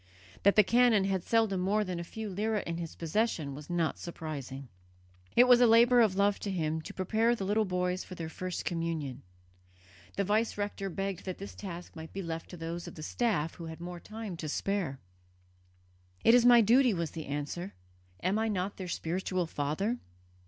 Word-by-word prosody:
That 200 - +5
the 210 - +8
canon 235 -1 +4
had 190 -1 0
seldom 220 -4 +2
more 205 +4 +2
than 180 -3 -4
a - - -3
few 220 +5 -6
lire 215 +3 0
in 170 -4 -3
his 170 -2 -6
possession 165 -4 -1
was 145 +3 -10
not 170 -2 0
surprising. 140 -5 -6 0.7
It 245 - +8
was 250 -1 +6
a 245 - +7
labour 235 +2 +6
of 210 -5 +3
love 200 +1 +2
to 205 - -4
him 160 -4 -1
to - - -9
prepare 220 +5 +2
the 200 - -4
little 210 +2 +2
boys 180 0 -1
for 185 - -9
their 165 -2 -5
first 180 +2 -5
communion. 160 -6 -2 1.0
The 200 - +2
vice 215 +3 +1
rector 205 -1 -3
begged 195 0 -4
that 185 -2 -4
this 200 - -8
task 175 -4 -8
might 160 0 -9
be 195 - -4
left 165 -1 -5
to 180 - -9
those 165 +1 -5
of - - -9
the 155 - -8
staff 170 -5 0
who 170 - -8
had 160 0 -8
more 175 0 -6
time 215 -1 -7
to 155 -2 -5
spare. 180 -5 -1 1.2
"It 230 - +7
is 245 0 +6
my 240 -1 +8
duty," 240 +1 +5
was 170 -3 -2
the 160 -2 -7
answer. 145 +6 -4 0.5
"Am 190 +4 +2
I 225 - +1
not 200 -1 -2
their 185 - -5
spiritual 180 +2 -1
father?" 160 +11 -2
185 Hz, 195 wpm, -31 LUFS, 165-215 Hz, 1.2 s, the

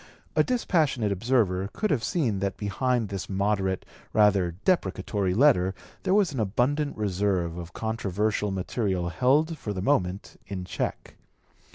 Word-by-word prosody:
A - - +5
dispassionate 155 - +1
observer 100 -3 +1
could 215 -1 -1
have 130 -7 +1
seen 115 - 0
that 100 0 -2
behind 115 +2 0
this 100 -2 -5
moderate, 95 -1 0 0.3
rather 100 -5 +3
deprecatory 95 - +1
letter 95 -8 +4 0.3
there 185 - +1
was 200 -7 +3
an 130 - -3
abundant 130 +8 0
reserve 95 -4 0
of 85 -1 -8
controversial 105 -1 -1
material 95 -2 -1
held 150 - +2
for 105 - -4
the 95 - -4
moment 95 -7 -1
in 95 -3 -5
check. - - -4
105 Hz, 140 wpm, -27 LUFS, 95-130 Hz, 0.3 s, A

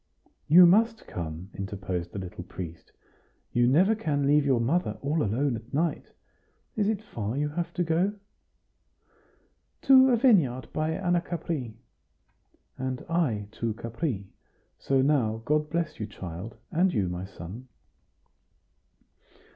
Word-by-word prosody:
"You 175 +4 +9
must 225 +5 +3
come," 85 +2 -6
interposed 95 -3 -4
the - - -7
little 90 -2 -6
priest; 85 -2 -9 0.6
"you 120 0 +3
never 180 - +4
can 150 -10 -1
leave 145 0 +4
your 130 -3 +3
mother 155 +10 0
all 150 +3 0
alone 125 +4 0
at 115 +2 -10
night. 160 +4 -1 0.6
Is 210 -2 +1
it 215 -1 -2
far 115 - -4
you 150 +1 0
have 170 +3 -3
to 180 - +1
go?" 170 +5 +1 1.7
"To 265 -1 +7
a 245 - +4
vineyard 170 - +3
by 155 +1 0
Anacapri." 170 - -2 1.0
"And 130 -1 -3
I 130 -12 0
to 115 -1 -3
Capri. 115 - -4 0.5
So 135 -1 +2
now 115 -6 +1
God 150 +1 +1
bless 170 -1 -2
you, 105 - -3
child 95 +1 -8
and 180 +2 +3
you, 100 - 0
my 90 +1 -4
son." 95 +6 -9
135 Hz, 130 wpm, -27 LUFS, 105-170 Hz, 1.7 s, You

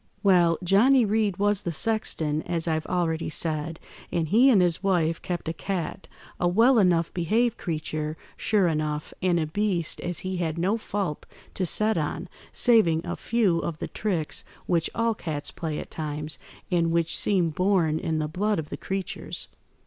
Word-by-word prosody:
"Well, 175 -4 +4
Johnny 230 +8 +5
Reed 210 -2 +1
was 205 0 +2
the 170 - -3
sexton, 160 -5 0
as 170 0 -2
I've 160 -1 -1
already 170 -3 -1
said, 160 +1 -3 0.3
and 165 -2 0
he 240 +7 +6
and 225 -7 +6
his 175 -1 +2
wife 170 -4 +1
kept 175 -3 -4
a 160 - -1
cat, 190 +1 -4 0.3
a 175 - +2
well 230 +7 +5
enough 175 -4 +2
behaved 220 +7 +1
creature, 155 -2 -3 0.2
sure 205 -4 +2
enough, 150 -2 -2
and 180 -2 +2
a 160 - 0
beast 175 0 -1
as 175 -1 -3
he 185 0 -2
had 165 -2 -2
no 185 +6 +1
fault 195 -8 -3 0.3
to 185 - -1
set 215 +2 +2
on, 160 +4 -3 0.2
saving 175 -10 +4
a - - -3
few 210 -8 +1
of 165 -2 -3
the - - -4
tricks 180 -8 -2 0.2
which 170 -2 +1
all 230 0 +2
cats 150 -8 -4
play 160 -3 -4
at - - -7
times, 150 -1 -4 0.3
and 170 -2 +2
which 170 0 +1
seem 180 -5 +2
born 175 -3 +2
in 160 -1 -1
the 155 -1 -1
blood 205 +6 0
of 155 -2 -4
the - - -5
creatures. 195 -1 -4
175 Hz, 175 wpm, -26 LUFS, 160-200 Hz, 0.3 s, he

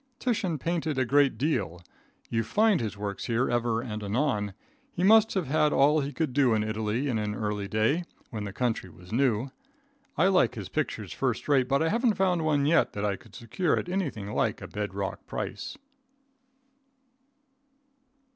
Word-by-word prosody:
Titian 205 -11 -1
painted 160 -1 -2
a 130 - +2
great 140 +2 +3
deal. 125 - -1 0.5
You 115 - 0
find 210 - +3
his 105 -2 -4
works 100 -1 -4
here 120 +1 0
ever 120 -1 +1
and 110 -3 -5
anon. 105 -2 -1 0.4
He 180 - -3
must 220 +2 +6
have 185 -4 0
had 150 +2 +2
all 145 +3 +4
he 140 0 -2
could 150 -1 -2
do 130 -4 +4
in 105 - +1
Italy 110 +4 -1
in 120 -5 0
an 105 -1 -2
early 105 -2 -2
day, 110 - +1 0.3
when 110 -2 -4
the 100 - -5
country 115 -3 -2
was 90 +2 -15
new. 125 0 +1 0.7
I 165 - +4
like 185 - +3
his - - -6
pictures - - -3
first - - -2
rate, 135 -3 +3
but 140 +3 +2
I 165 - +2
haven't 230 +1 +2
found 180 -3 +1
one 145 -3 +2
yet 160 +3 +3
that 105 0 -2
I 100 -1 0
could - - -17
secure 150 - 0
at - - -3
anything 135 - -3
like - - 0
a - - -8
bed 105 -2 -4
rock 100 -1 -4
price. - - -5
130 Hz, 180 wpm, -28 LUFS, 105-160 Hz, 0.7 s, must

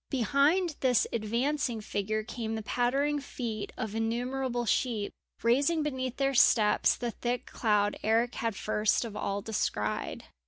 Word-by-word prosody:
Behind 290 - +2
this 250 -3 +3
advancing 235 +3 0
figure 215 +1 -2
came 225 -1 -4
the 220 - -4
pattering 275 +6 +1
feet 235 -6 -5
of 220 -2 -4
innumerable 240 +2 -1
sheep, 220 -1 0 0.3
raising 280 +7 +3
beneath 260 -4 -3
their 275 0 +1
steps 215 -4 +4
the 240 -1 -3
thick 245 +2 -3
cloud 210 -2 +1
Eric 230 +3 +2
had 230 -3 -2
first 215 +3 +1
of 220 -3 -7
all 200 -1 -2
descried. 105 - -2
235 Hz, 135 wpm, -30 LUFS, 215-265 Hz, 0.3 s, steps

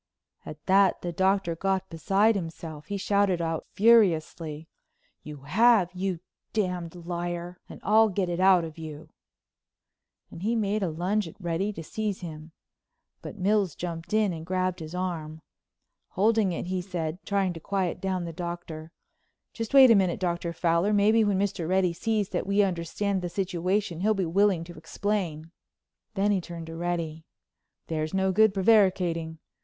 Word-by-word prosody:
At 155 -1 -10
that 195 -1 +3
the 175 - -2
Doctor 190 -1 +1
got 190 +1 -1
beside 195 +7 +2
himself. 165 -5 -6
He 200 - -3
shouted 200 -2 +1
out 165 -1 -3
furiously: 165 -8 +2 0.5
"You 150 -2 -10
have, 205 +4 +4
you 185 -2 -3 0.3
d——d 180 -5 -2
liar, 175 0 -5
and - - -10
I'll 220 +2 +5
get 195 -1 -1
it 175 0 -3
out 185 -2 +5
of 160 0 -8
you," 155 -1 -8 1.2
and 165 - -10
he 225 +4 0
made 210 -1 0
a 190 - 0
lunge 180 +5 -1
at 165 - -13
Reddy 175 +3 -1
to 165 - -7
seize 210 +3 -3
him. 160 -2 -8 0.7
But - - -8
Mills 195 -3 +1
jumped 170 -1 -6
in 215 -3 +2
and 160 -1 -7
grabbed 185 +1 -1
his 160 +1 -7
arm. 160 -4 -4 0.6
Holding 215 0 +2
it 170 - -4
he 185 0 -2
said, 175 -2 -4
trying 195 -3 0
to 165 - -8
quiet 190 +1 -2
down 185 -2 -2
the 165 - -6
Doctor: 170 -2 -6 0.6
"Just 225 -2 -5
wait 265 -3 +8
a - - +7
minute, 190 -3 +2
Dr. 170 -2 -2
Fowler. 170 +4 +1
Maybe 215 +2 +4
when 205 -2 +1
Mr. 190 -4 -1
Reddy 185 -2 +2
sees 215 +2 -1
that - - -3
we 200 +1 +3
understand 190 +2 -1
the 175 - -3
situation, 185 0 -1
he'll 215 +3 +2
be 190 -2 0
willing 190 0 +2
to 175 +1 -10
explain." 165 -2 -3 0.6
Then 205 +1 +2
he 195 -2 +1
turned 170 -1 -8
to 165 0 -8
Reddy: 165 -2 -3 0.6
"There's 155 +2 -3
no 190 0 +2
good 220 +2 +5
prevaricating. 185 -5 +2
180 Hz, 165 wpm, -27 LUFS, 165-200 Hz, 1.2 s, wait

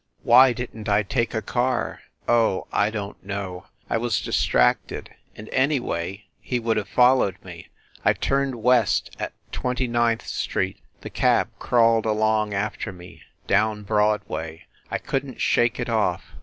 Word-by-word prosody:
Why 125 +2 +7
didn 120 -3 -6
t 105 - -1
I 100 +1 +3
take 120 +3 -1
a 110 - -1
car? 125 +3 -1 0.3
Oh, 115 -5 +2
I 105 - +2
don 105 -2 -5
t - - -36
know! 95 -2 -6 0.2
I 115 - 0
was 120 -2 0
distracted... - - +1 0.2
and, 105 - -10
anyway, 115 - -1
he 125 - -2
would 115 -1 0
have 105 - -3
followed 125 -6 +4
me.... 90 -2 -10 0.4
I - - +4
turned 135 -1 0
west 125 -3 +2
at - - -4 0.2
Twenty 125 0 -2
ninth 120 -1 +1
Street... - - -2 0.2
the - - -8
cab - - +2
crawled 115 -2 +3
along 110 0 +1
after 100 0 -3
me... 90 -1 -13 0.2
down 105 +1 +1
Broadway 105 -6 -1 0.2
I - - -1
couldn 135 -1 -3
t - - -20
shake 120 0 +2
it 120 - -2
off. 110 -6 0
110 Hz, 155 wpm, -24 LUFS, 100-120 Hz, 0.4 s, Why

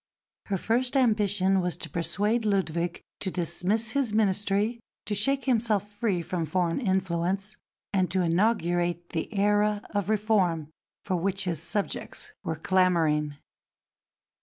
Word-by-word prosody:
Her 195 - 0
first 245 +7 0
ambition 205 -6 +3
was 180 -1 -2
to - - -4
persuade 205 +7 0
Ludwig 175 -5 -1 0.2
to 190 - -2
dismiss 185 +6 0
his 255 -6 0
Ministry, 205 +2 +1 0.3
to 210 - -2
shake 270 +7 +2
himself 220 -5 +1
free 205 -4 -1
from 170 -2 -2
foreign 175 - 0
influence, 190 0 -1 0.4
and 185 -2 +2
to 185 0 +1
inaugurate 175 -2 +1
the 160 +5 -3
era 210 0 +2
of 205 -2 -1
reform 195 -8 +1 0.4
for 185 -2 0
which 195 +2 0
his 170 -5 -2
subjects 205 - -3
were 160 - -2
clamouring. 160 -4 +2
195 Hz, 130 wpm, -27 LUFS, 175-210 Hz, 0.4 s, ambition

